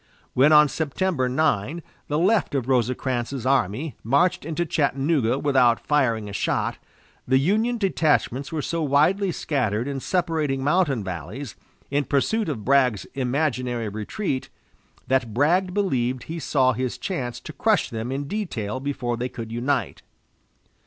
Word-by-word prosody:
When, 135 +4 +5
on 150 -1 +7
September 155 -1 -1
9, 155 +2 0 0.2
the 150 - 0
left 190 -1 +2
of 130 -3 -1
Rosecrans's 125 0 -1
army 130 - 0
marched 140 +8 +2
into 165 +2 -1
Chattanooga 140 -4 +1
without 130 -5 +3
firing 120 -8 +1
a 100 - -7
shot, - - -1 0.5
the 130 +1 +4
Union 215 - +1
detachments 150 - +1
were 155 -3 -2
so 165 -1 -2
widely 160 +7 +2
scattered 120 -8 -1
in 140 -1 -3
separating 155 -5 -1
mountain 145 - +2
valleys, 95 - -6 0.4
in 145 0 +1
pursuit 200 - +1
of 110 -9 -4
Bragg's 130 -6 +3
imaginary 125 -4 -1
retreat, 130 - -3 0.6
that 125 -5 0
Bragg 175 +8 +2
believed 130 -11 0
he 165 +5 -6
saw 130 -4 +2
his 125 +1 -3
chance 125 -10 -4
to 155 - -9
crush 215 +1 +1
them 115 +2 -4
in 140 +1 -3
detail 130 - -3
before 130 -4 -2
they 125 +2 -2
could 115 -3 -7
unite. 120 -1 -1
135 Hz, 140 wpm, -24 LUFS, 120-160 Hz, 0.6 s, on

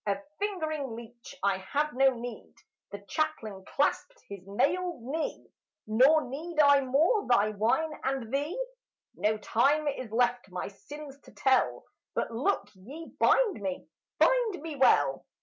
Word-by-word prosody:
Of 200 - +1 0.2
fingering 315 - -2
leech 235 +3 -11
I 200 -1 +2
have 285 +10 -1
no 265 0 +4
need!" 235 -1 -8 0.3
The 200 0 -9
chaplain 220 -8 -2
clasped 475 - -1
his 200 -2 -9
mailed 295 - 0
knee. 305 +6 -4 0.4
"Nor 265 +9 +5
need 310 +5 -5
I 285 -1 +6
more 310 - +2
thy 215 -3 +3
whine 240 +10 0
and 265 -3 -2
thee! 295 - -1 0.5
No 215 +1 0
time 280 +8 +2
is 255 -5 -3
left 245 -1 +1
my 180 +1 -5
sins 285 +7 -11
to - - -15
tell; 265 -1 +1 0.3
But - - -1
look 240 - 0
ye 270 - -11
bind 445 - +3
me, 190 -2 -4 0.3
bind 470 -9 +2
me 320 -2 -5
well!" 145 - +3
270 Hz, 145 wpm, -29 LUFS, 220-310 Hz, 0.5 s, I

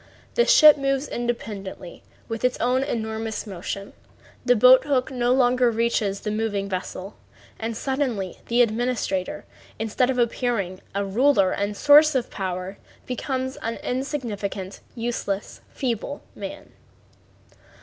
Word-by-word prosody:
The 480 - +3
ship 300 -1 +8
moves 275 +1 0
independently 210 -7 -5 0.3
with 225 0 -5
its 250 0 +1
own 250 +3 +2
enormous 220 -3 -3
motion, 200 0 -6 0.5
the 245 0 +4
boat 255 +3 +7
hook 265 -4 0
no 245 -1 +1
longer 250 -1 +4
reaches 225 -3 0
the 210 - -3
moving 210 -2 -1
vessel, 190 +1 -5 0.4
and 225 0 -3
suddenly 250 -10 -2
the 240 +1 +4
administrator, 230 -5 -2 0.3
instead 225 +4 0
of 260 - 0
appearing 235 -6 -1
a 200 0 0
ruler 205 -1 +3
and 205 +1 -1
a - - -14
source 295 +4 +6
of 250 -2 -1
power, 185 0 -4 0.3
becomes 260 +1 -3
an 230 +1 -3
insignificant, 220 -8 -3 0.2
useless, 230 -4 -3
feeble 255 +2 -3
man. - - -8
230 Hz, 130 wpm, -24 LUFS, 200-255 Hz, 0.5 s, ship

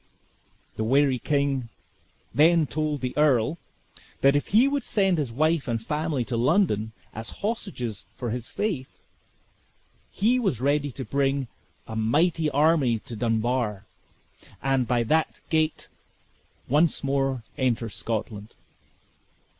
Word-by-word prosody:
The 110 - -1
wary 135 +2 +3
king 140 -3 0 0.6
then 160 +2 +5
told 150 +2 -2
the 125 -1 -3
earl, 150 +1 +2 0.6
that 140 +1 +5
if 145 - 0
he 230 +6 +5
would 285 0 0
send 195 -8 +1
his 135 -6 -2
wife 155 +4 +1
and 115 -1 0
family 150 +1 -2
to 120 - -3
London, 115 - +2 0.2
as 110 +1 -6 0.2
hostages 180 - -3
for 120 -3 -4
his 120 +1 -4
faith, 170 -12 -3 1.1
he 235 +6 +2
was 190 - 0
ready 145 +2 +1
to 130 +1 -6
bring 135 +1 0 0.4
a 110 - -7
mighty 155 +8 +2
army 145 -4 +3
to 115 +2 -9
Dunbar; 115 -2 -1 0.7
and, 135 -2 +1
by 120 0 +2
that 155 +7 +1
gate, 155 -1 +1 0.8
once 150 +4 +2
more 135 -3 0
enter 125 -3 0
Scotland. 110 -1 -5
135 Hz, 125 wpm, -26 LUFS, 120-155 Hz, 1.1 s, then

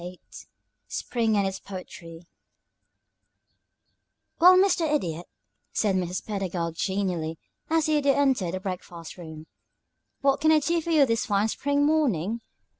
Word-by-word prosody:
VIII 180 +1 -9 0.7
SPRING 225 -3 -1
AND 200 - +2
ITS 190 0 -3
POETRY 175 -3 -10 2.1
"Well, 365 +2 +8
Mr. 360 -5 +3
Idiot," 175 - -2 0.5
said 205 -3 +1
Mrs. 180 0 -2
Pedagog, 185 -5 -3
genially, 175 -4 -2 0.3
as 320 -1 +2
the 310 -1 +2
Idiot 280 -1 +2
entered 255 -11 +1
the - - -3
breakfast 180 -3 -7
room, 160 -3 -10 0.8
"what 275 0 +2
can 315 +1 +4
I 315 - +6
do 335 +3 +1
for 335 - -6
you 305 -4 +5
this 230 -1 -1
fine 205 0 +1
spring 285 +4 0
morning? 235 - +1
205 Hz, 135 wpm, -26 LUFS, 180-290 Hz, 2.1 s, Well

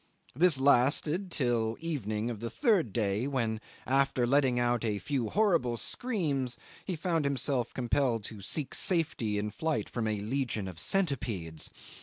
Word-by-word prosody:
This 165 -1 +5
lasted 145 +7 +3
till 120 -7 0
the 165 - -8
evening 110 -7 -2
of 110 - -6
the 115 +1 -4
third 185 - +2
day, 105 +3 0
when, 115 -5 -1 0.2
after 135 -1 +2
letting 130 -1 +3
out 120 -1 +1
a 105 -3 0
few 125 -1 -2
horrible 170 - +2
screams, 145 - -1 0.3
he 185 - -3
found 165 -1 0
himself 135 -3 0
compelled 125 -2 0
to 105 -1 -8
seek 140 +8 -2
safety 145 - 0
in 105 +1 -2
flight 160 +7 -2
from 115 -2 -3
a 105 -1 -1
legion 115 -3 -2
of 90 -4 -6
centipedes. 115 - -1
125 Hz, 155 wpm, -30 LUFS, 110-150 Hz, 0.3 s, This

